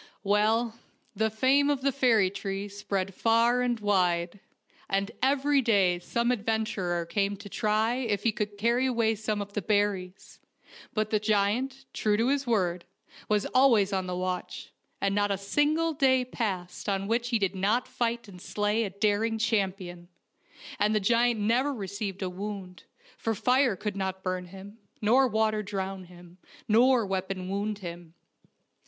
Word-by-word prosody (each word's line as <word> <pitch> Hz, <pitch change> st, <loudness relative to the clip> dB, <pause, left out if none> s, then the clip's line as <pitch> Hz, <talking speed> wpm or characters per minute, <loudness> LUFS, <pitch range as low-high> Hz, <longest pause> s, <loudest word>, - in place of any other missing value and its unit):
Well, 220 Hz, +3 st, +1 dB, 0.4 s
the 220 Hz, +2 st, +1 dB
fame 265 Hz, +6 st, +3 dB
of 285 Hz, -2 st, 0 dB
the 275 Hz, +1 st, +2 dB
fairy 230 Hz, -8 st, +3 dB
tree 195 Hz, 0 st, -4 dB
spread 195 Hz, -1 st, -3 dB
far 230 Hz, +4 st, +3 dB
and 245 Hz, -2 st, 0 dB
wide, 180 Hz, -3 st, +1 dB, 0.5 s
and 195 Hz, +2 st, 0 dB
every 280 Hz, +1 st, +3 dB
day 195 Hz, -7 st, +3 dB
some 235 Hz, +7 st, 0 dB
adventurer 210 Hz, -6 st, -1 dB
came 200 Hz, +3 st, -1 dB
to 205 Hz, +1 st, -10 dB
try 215 Hz, +2 st, +1 dB
if 225 Hz, -6 st, -1 dB
he 230 Hz, -, +3 dB
could 210 Hz, -1 st, -4 dB
carry 235 Hz, +5 st, +2 dB
away 230 Hz, -3 st, +1 dB
some 215 Hz, -1 st, -2 dB
of 200 Hz, 0 st, -15 dB
the 210 Hz, -, -2 dB
berries; 200 Hz, -2 st, -1 dB, 0.6 s
but 215 Hz, -1 st, 0 dB
the 215 Hz, -, +2 dB
giant, 220 Hz, +6 st, 0 dB
true 210 Hz, -1 st, +1 dB
to 230 Hz, +3 st, +2 dB
his 280 Hz, -1 st, 0 dB
word, 180 Hz, -6 st, 0 dB, 0.5 s
was 210 Hz, -1 st, +2 dB
always 230 Hz, -7 st, +4 dB
on 190 Hz, -1 st, -1 dB
the 180 Hz, -, -3 dB
watch, 180 Hz, 0 st, -4 dB, 0.3 s
and 195 Hz, 0 st, 0 dB
not 205 Hz, 0 st, +1 dB
a 200 Hz, -, 0 dB
single 300 Hz, -, +1 dB
day 260 Hz, -3 st, +3 dB
passed 200 Hz, -7 st, -4 dB
on 195 Hz, -1 st, -1 dB
which 235 Hz, +2 st, 0 dB
he 235 Hz, -, +2 dB
did 195 Hz, -3 st, 0 dB
not 205 Hz, +6 st, 0 dB
fight 235 Hz, -1 st, -2 dB
and 180 Hz, -3 st, -12 dB
slay 210 Hz, +3 st, 0 dB
a 205 Hz, -, -2 dB
daring 210 Hz, +3 st, 0 dB
champion, 190 Hz, -5 st, -2 dB, 0.7 s
and 210 Hz, +2 st, +2 dB
the -, -, +3 dB
giant 235 Hz, +2 st, +2 dB
never 240 Hz, +7 st, +2 dB
received 200 Hz, -4 st, -5 dB
a 185 Hz, -, -2 dB
wound, 190 Hz, -1 st, -7 dB, 0.3 s
for 225 Hz, -1 st, -1 dB
fire 250 Hz, +1 st, +2 dB
could 205 Hz, +1 st, -4 dB
not 190 Hz, -1 st, -3 dB
burn 185 Hz, -1 st, -2 dB
him, 195 Hz, +4 st, -12 dB, 0.2 s
nor 250 Hz, +5 st, +4 dB
water 220 Hz, -1 st, +1 dB
drown 195 Hz, -2 st, -4 dB
him, 175 Hz, 0 st, -16 dB, 0.3 s
nor 240 Hz, +1 st, +4 dB
weapon 190 Hz, -1 st, -3 dB
wound 205 Hz, +2 st, -2 dB
him. 170 Hz, -1 st, -8 dB
210 Hz, 160 wpm, -28 LUFS, 195-235 Hz, 0.7 s, always